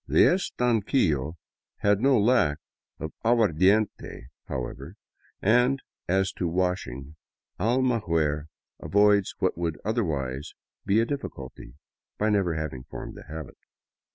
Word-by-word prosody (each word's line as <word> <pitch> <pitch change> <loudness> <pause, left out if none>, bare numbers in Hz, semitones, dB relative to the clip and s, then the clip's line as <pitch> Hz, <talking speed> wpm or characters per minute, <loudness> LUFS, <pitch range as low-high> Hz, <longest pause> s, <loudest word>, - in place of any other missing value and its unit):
The - - +5
estanquillo 110 - +1 0.5
had 105 0 +3
no 135 0 +4
lack 105 -10 +3 0.4
of 80 - -5
aguardiente, 105 - +2 0.2
how 65 - -2
ever, 70 +10 -9 0.5
and 125 +6 +4 0.3
as 95 +1 +2
to 90 - -2
washing, 85 -6 -2 0.4
Almaguer 100 - +1 0.3
avoids 100 -1 +3
what - - 0
would 85 -3 -2
otherwise 75 - -2 0.3
be 100 +3 +4
a 115 - +3
difficulty 70 - -7 0.4
by 110 +1 +1
never 95 -5 +1
having 75 -5 -4
formed - - -8
the - - -12
habit. 80 0 -8
95 Hz, 115 wpm, -26 LUFS, 75-110 Hz, 0.5 s, The